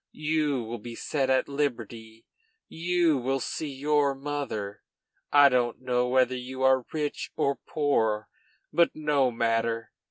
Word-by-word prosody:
You 145 -5 +1
will 115 +1 -6
be 115 +2 -8
set 135 0 -1
at 130 0 +2
liberty, 115 -6 -4 0.4
you 170 -3 +1
will 135 +2 -1
see 155 +3 -4
your 140 0 +1
mother! 135 -8 -4 0.5
I 145 -1 +8
don't 125 -3 +1
know 125 -1 0
whether 130 0 +2
you 130 +1 -5
are 130 -2 +3
rich 150 -2 -3
or 140 0 0
poor, 110 -8 0 0.5
but 170 -1 +3
no 150 -4 +2
matter! 115 -1 -1
130 Hz, 135 wpm, -27 LUFS, 120-145 Hz, 0.5 s, I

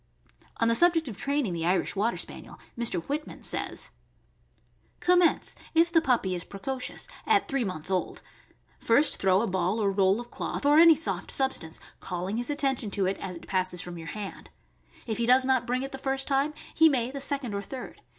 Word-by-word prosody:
On 230 - +1
the 230 - +3
subject 330 +3 +4
of 225 - -6
training 280 -4 -1
the 165 -1 -3
Irish 180 +4 0
Water 215 +4 0
Spaniel, - - -4 0.2
Mr. 225 -8 0
Whitman 295 - -5
says: - - +1 1.1
Commence 355 -1 +3
— - - -20
if 335 +1 +4
the 330 -1 +4
puppy 240 - +1
is 175 -1 -1
precocious— 250 +6 -5 0.2
at 425 -2 +3
three 275 -2 -1
months 185 -3 -4
,old. 185 -1 -2 0.6
First 280 +6 +2
throw 190 0 +3
a 230 - -1
ball 185 +3 -1
or 200 -2 +1
roll 195 +1 +2
of 240 0 -9
cloth, - - -4
or 295 +2 +6
any 330 -1 +8
soft 320 - -3
substance, 265 -12 0 0.2
calling 185 +4 -4
his 240 +3 -2
attention 270 -6 0
to 195 -1 0
it 190 +1 -1
as 185 -2 -6
it 170 - -11
passes 185 -1 -1
from 175 0 -7
}~our 165 - -9
hand; 205 +2 -7 0.6
if 225 -1 -3
he 235 - 0
does 255 +1 +5
not 260 -2 +1
bring 250 +2 -1
it 270 - -6
the 270 - -7
first 270 0 -1
time, 280 +2 0 0.2
he 320 0 +6
may 250 -3 0
the 275 0 -6
second 275 -5 -2
or 200 - -2
third. 255 +4 -9
240 Hz, 200 wpm, -27 LUFS, 195-280 Hz, 1.1 s, any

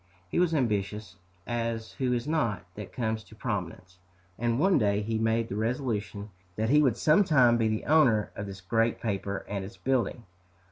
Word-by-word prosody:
He - - 0
was 175 -2 +2
ambitious, 105 - -1 0.3
as 115 -1 -3
who 130 -2 -1
is 120 +2 -1
not, 115 - 0
that 105 0 -8
comes 110 -2 -2
to 110 - -16
prominence; 95 -5 -5 0.4
and 120 0 +1
one 185 +5 +4
day 105 -2 +1
he 110 +1 -1
made 115 +1 +1
the 100 - -5
resolution 110 -3 -2 0.2
that 110 +4 0
he 150 +1 +6
would 130 -6 +2
sometime 150 - +5
be 115 -1 +2
the 110 0 -2
owner 130 -9 +4
of 100 - -5
this 95 -1 -8
great 115 +5 +1
paper 100 -2 -3
and 100 -1 -3
its 95 - -10
building! 125 -2 -1
110 Hz, 180 wpm, -28 LUFS, 105-125 Hz, 0.4 s, he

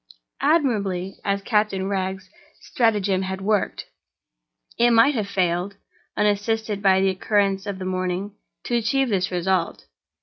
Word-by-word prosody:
Admirably 210 - 0
as 200 0 -1
Captain 210 -4 0
Wragge's 190 -1 -3 0.3
stratagem 205 -5 +1
had 190 0 -4
worked, 205 +1 -1 0.9
it 240 +1 +5
might 230 +5 +5
have 215 -6 -2
failed—unassisted 200 +3 -2
by 190 -1 +4
the 195 0 +3
occurrence 195 +1 0
of 200 -2 -3
the 185 - -6
morning—to 185 +5 -4
achieve 240 +3 +1
this 185 -3 0
result. 180 - -1
200 Hz, 115 wpm, -23 LUFS, 190-215 Hz, 0.9 s, it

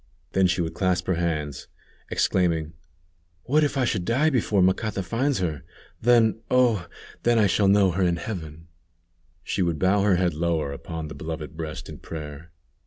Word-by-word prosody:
Then 95 -1 +3
she 85 0 0
would 80 -1 -3
clasp 90 -2 0
her 95 - +1
hands, 80 -5 -2 0.4
exclaiming: 80 -3 +1 0.7
"What 150 +4 +3
if 145 -1 0
I 130 - +2
should 105 -6 -1
die 135 - +2
before 105 -7 +2
Macata 95 +2 +1
finds 130 +9 0
her? 80 -6 -2 0.4
Then, 115 -1 +4
oh! 120 -8 +3 0.3
then, 120 0 +3
I 110 - +5
shall 100 +1 +2
know 100 -1 +5
her 95 +3 -2
in 90 -2 +2
heaven," 85 -3 -7 0.8
she 100 - -2
would 85 -3 +1
bow 95 +3 +3
her 100 -2 +3
head 90 -1 +1
lower 80 -2 -1
upon 80 +3 -6
the - - -8
beloved 80 -2 -6
breast 80 -1 -6
in - - -9
prayer. 75 0 -8
90 Hz, 175 wpm, -25 LUFS, 80-105 Hz, 0.8 s, I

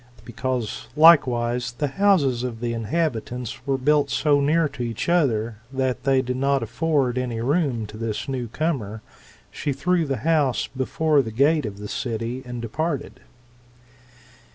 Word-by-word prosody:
Because, 125 -2 -3
likewise, 125 -6 +4
the 145 +4 -2
houses 145 -8 +2
of 125 -3 -4
the 120 0 -2
inhabitants 125 0 -3
were 135 -1 +1
built 145 +1 +2
so 145 +1 +2
near 155 +3 +3
to 135 -3 -9
each 115 -2 -3
other, 120 -11 +1
that 130 -1 -2
they 135 -1 +3
did 125 0 -3
not 135 -1 +1
afford 130 +1 0
any 120 -3 -3
room 135 -3 0
to 105 +1 -10
this 110 -1 -3
new 130 -3 -3
comer, 115 -6 -3 0.5
she 145 - -3
threw 170 +5 +1
the 135 -1 -1
house 150 -6 +2
before 145 +3 +1
the 115 - -5
gate 140 +4 +2
of 100 -1 -7
the 105 0 -7
city, 115 +3 -3
and 120 -1 -6
departed. 150 +6 -3
130 Hz, 155 wpm, -23 LUFS, 120-150 Hz, 0.5 s, likewise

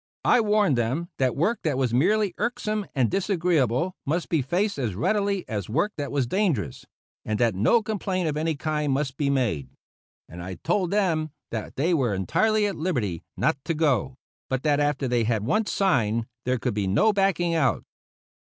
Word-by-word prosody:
I 245 - +5
warned 205 - +2
them 135 +10 -1
that 130 -2 +1
work 210 +11 +1
that 150 -5 0
was 130 -3 0
merely 195 - +2
irksome 215 -3 -2
and 130 -4 +2
disagreeable 175 - +1
must 165 +5 -2
be 160 -4 +2
faced 180 +7 -1
as 115 -8 -2
readily 200 - 0
as 105 -4 -4
work 205 - 0
that 145 -1 -3
was 140 -3 +1
dangerous, 170 - -1 0.4
and 110 -1 -2
that 115 -2 +2
no 125 - +3
complaint 190 -4 -2
of 150 - -1
any 160 +1 0
kind 150 -1 -1
must 135 -1 -1
be 145 -2 0
made; 110 - 0 0.6
and 85 +1 -9
I 95 +1 -6
told 185 - 0
them 170 -6 +1 0.2
that 110 -2 -5
they 165 +6 +1
were 125 -10 +1
entirely 215 - +2
at 200 - -2
liberty 120 - -1 0.2
not 135 - +1
to 165 - -1
go, 135 -5 +1 0.3
but 130 -1 -1
that 150 -2 +2
after 145 -2 0
they 120 -1 +1
had 110 -2 0
once 215 - +1
signed 115 - +1 0.2
there 130 +1 +1
could 125 0 -2
then 105 - -1
be 95 - -1
no 210 - +3
backing 195 -4 +1
out. 155 -5 +1
150 Hz, 185 wpm, -25 LUFS, 120-190 Hz, 0.6 s, I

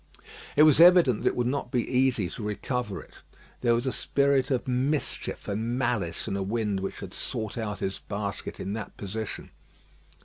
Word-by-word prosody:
It 150 - +7
was 155 -1 +6
evident 170 -10 +7
that - - 0
it - - -4
would 125 - 0
not 130 0 -1
be 120 -1 0
easy 125 -6 +2
to 95 - -8
recover 105 +1 -3
it. - - -19 0.4
There 120 -1 +3
was 120 +2 -1
a 130 - +1
spirit 140 -1 +1
of 130 0 0
mischief 130 +4 -1
and 115 +4 -1
malice 120 -10 -1
in - - -2
a 100 - -1
wind 105 0 -1
which 95 - -5
had - - -7
sought 110 -2 -3
out 105 -3 -4
his 95 - -2
basket 100 -1 -5
in 100 - -3
that 110 -1 -6
position. 105 +1 -5
120 Hz, 190 wpm, -27 LUFS, 105-130 Hz, 0.4 s, It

